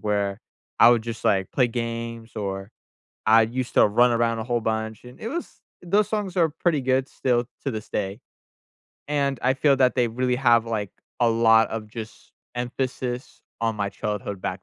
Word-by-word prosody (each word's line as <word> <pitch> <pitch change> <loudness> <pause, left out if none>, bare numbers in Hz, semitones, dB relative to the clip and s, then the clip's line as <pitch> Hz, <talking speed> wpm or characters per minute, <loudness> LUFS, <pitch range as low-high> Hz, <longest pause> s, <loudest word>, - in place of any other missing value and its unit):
where 100 -1 -1 0.4
I 115 - +9
would 115 -2 +3
just, 115 -1 -6
like, 95 -2 +2
play 125 - +3
games 115 -1 -4
or 95 0 -4 0.6
I 110 +1 +7
used 125 +3 -3
to - - +6
run 120 +4 +4
around 115 -1 +1
a 110 - -3
whole 120 0 0
bunch, 110 0 -3
and 125 - -13
it 225 - -4
was 335 +6 -6 0.2
those 200 +4 +2
songs 205 -4 -3
are 165 -2 +4
pretty 160 -1 0
good 130 +1 +1
still 120 -2 0 0.2
to 135 - 0
this 110 -1 -6
day, 100 +5 -3 0.9
and 140 -2 0
I 130 +1 +3
feel 140 0 +3
that 130 -1 +3
they 120 -2 +3
really 125 +2 0
have, 120 -3 +4
like, 105 -4 -2 0.3
a 120 - +5
lot 115 0 +5
of 110 -1 -4
just 110 0 -9 0.2
emphasis 125 0 -4 0.2
on 115 -1 0
my 100 -1 -1
childhood 100 -1 -4
back 90 0 -4
115 Hz, 185 wpm, -24 LUFS, 110-130 Hz, 0.9 s, I